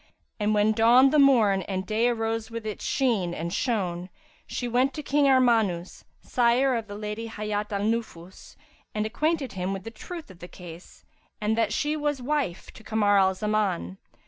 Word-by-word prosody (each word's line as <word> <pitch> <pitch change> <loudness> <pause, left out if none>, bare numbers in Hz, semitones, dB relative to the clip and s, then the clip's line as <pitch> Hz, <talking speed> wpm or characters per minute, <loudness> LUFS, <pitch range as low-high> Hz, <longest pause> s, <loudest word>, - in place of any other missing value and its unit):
And 210 0 +1
when 210 +1 +3
dawned 240 +5 +5
the 300 - +5
morn 225 -9 +5
and 190 0 -4
day 220 +4 +1
arose 225 -2 -2
with 230 -1 -6
its 215 -2 -5
sheen 210 -10 0
and 170 +2 -4
shone, 185 -7 -2 0.4
she 245 - -4
sent 250 +3 +1
to 300 - -5
King 285 +1 +2
Armanus, 225 -9 +2 0.2
sire 250 +2 +2
of 225 -2 -3
the 205 - -8
Lady 210 +2 -5
Hayat 210 -1 -4
al 200 -1 -1
Nufus, 210 -5 -4 0.4
and 210 0 0
acquainted 300 +5 -1
him 185 +1 -3
with 195 -1 -6
the 225 - -7
truth 320 - -9
of 180 - -16
the 175 - -9
case 175 -1 -13 0.3
and 215 +1 0
that 225 -2 +1
she 295 +7 0
was 295 -2 -1
wife 260 -8 -2
to 225 - -15
Kamar 205 -2 +2
al 190 0 +3
Zaman. 200 - -1
220 Hz, 180 wpm, -26 LUFS, 195-245 Hz, 0.4 s, dawned